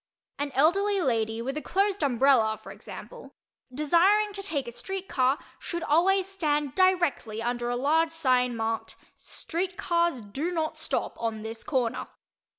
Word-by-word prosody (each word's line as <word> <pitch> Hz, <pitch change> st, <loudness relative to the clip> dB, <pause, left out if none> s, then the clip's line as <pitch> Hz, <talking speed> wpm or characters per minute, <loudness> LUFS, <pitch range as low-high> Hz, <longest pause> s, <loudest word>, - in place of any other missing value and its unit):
An 285 Hz, 0 st, -2 dB
elderly 390 Hz, +8 st, +3 dB
lady 230 Hz, -6 st, 0 dB
with 270 Hz, +3 st, -3 dB
a -, -, -2 dB
closed 395 Hz, +2 st, 0 dB
umbrella, 245 Hz, -5 st, +3 dB
for -, -, -11 dB
example, -, -, -11 dB, 0.4 s
desiring 360 Hz, +10 st, +3 dB
to 395 Hz, -, -5 dB
take 310 Hz, -10 st, -3 dB
a -, -, -5 dB
street 385 Hz, +9 st, -6 dB
car, 260 Hz, +1 st, +2 dB, 0.2 s
should 340 Hz, -1 st, -4 dB
always 370 Hz, +5 st, +3 dB
stand 300 Hz, -8 st, -1 dB
directly 345 Hz, -, +2 dB
under 240 Hz, +1 st, -2 dB
a 245 Hz, -, 0 dB
large 315 Hz, +5 st, +2 dB
sign 255 Hz, -6 st, +1 dB
marked 225 Hz, 0 st, -2 dB, 0.2 s
"Street 360 Hz, +2 st, -4 dB
Cars 340 Hz, -7 st, +1 dB
Do 265 Hz, +11 st, -3 dB
Not 320 Hz, -3 st, -2 dB
Stop -, -, -2 dB
On 220 Hz, -2 st, -2 dB
This 225 Hz, 0 st, -5 dB
Corner." 255 Hz, -4 st, -1 dB
295 Hz, 155 wpm, -27 LUFS, 245-360 Hz, 0.4 s, elderly